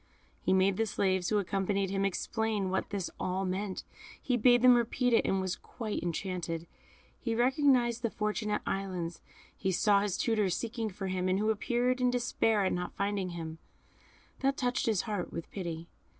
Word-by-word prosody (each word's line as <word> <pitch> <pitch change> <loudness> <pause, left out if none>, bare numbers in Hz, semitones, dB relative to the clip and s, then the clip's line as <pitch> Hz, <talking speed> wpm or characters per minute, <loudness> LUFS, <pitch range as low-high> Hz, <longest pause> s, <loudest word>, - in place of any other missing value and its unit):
He - - 0
made 190 0 +3
the 225 - +1
slaves 190 -3 +1
who 215 - +2
accompanied 195 0 0
him 195 0 +1
explain 210 0 -1
what 190 - -1
this 200 -3 -3
all 190 +1 -1
meant; 190 +1 -3 0.4
he 255 - 0
bade 245 +1 +5
them 250 0 +9
repeat 240 +1 +2
it, - - +5
and 195 - +1
was 185 -1 -1
quite 220 -3 -5
enchanted. 170 -1 -3 0.5
He 230 -2 -2
recognised 245 -1 +3
the 230 - 0
Fortunate 210 0 -1
Islands; 180 -4 -3 0.3
he 190 - -1
saw 200 +2 +4
his 200 -2 -1
tutors 210 -6 +1
seeking 225 -1 -3
for 195 0 -6
him, 185 -1 -1
and 185 - +2
who 215 +2 +2
appeared 245 +4 0
in 250 - +4
despair 225 -4 +1
at - - +1
not 180 0 -3
finding 200 -2 -1
him 160 -1 -6 0.8
that 275 +1 +1
touched 250 -3 0
his 215 -5 +2
heart 205 -5 -3
with 165 - -6
pity. 170 -4 -5
200 Hz, 180 wpm, -31 LUFS, 185-230 Hz, 0.8 s, them